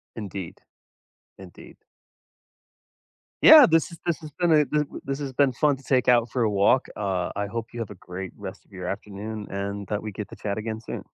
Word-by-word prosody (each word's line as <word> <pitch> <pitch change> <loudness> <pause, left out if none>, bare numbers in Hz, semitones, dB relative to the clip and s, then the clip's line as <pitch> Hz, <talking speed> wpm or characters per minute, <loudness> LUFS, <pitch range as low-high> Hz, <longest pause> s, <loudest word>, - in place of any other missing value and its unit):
Indeed. 100 -5 -7 0.8
Indeed. 95 -2 -13 1.7
Yeah, 310 -3 +10
this 165 0 +2
is 170 - -11
this 170 -2 0
has 155 -1 -9
been 175 -2 +3
a, 150 -2 +5
w 150 0 -2
this 135 +1 -3
has 140 -2 -5
been 140 0 +3
fun 145 +3 +2
to 135 - -16
take 130 -1 +1
out 120 -2 +4
for 125 -2 0
a 110 - +2
walk. 100 +6 +3
Uh, 95 -4 -1
I 100 0 -2
hope 115 +2 -6
you 120 - -6
have 110 - -5
a 105 - -9
great 90 +1 -7
rest - - -8
of - - -32
your 90 -1 -7
afternoon 105 +2 -6
and 100 +1 -4
that 105 0 -2
we 110 - -5
get 105 +1 -7
to - - -10
chat 100 0 -4
again 110 0 -4
soon. - - -7
110 Hz, 210 wpm, -25 LUFS, 100-135 Hz, 1.7 s, Yeah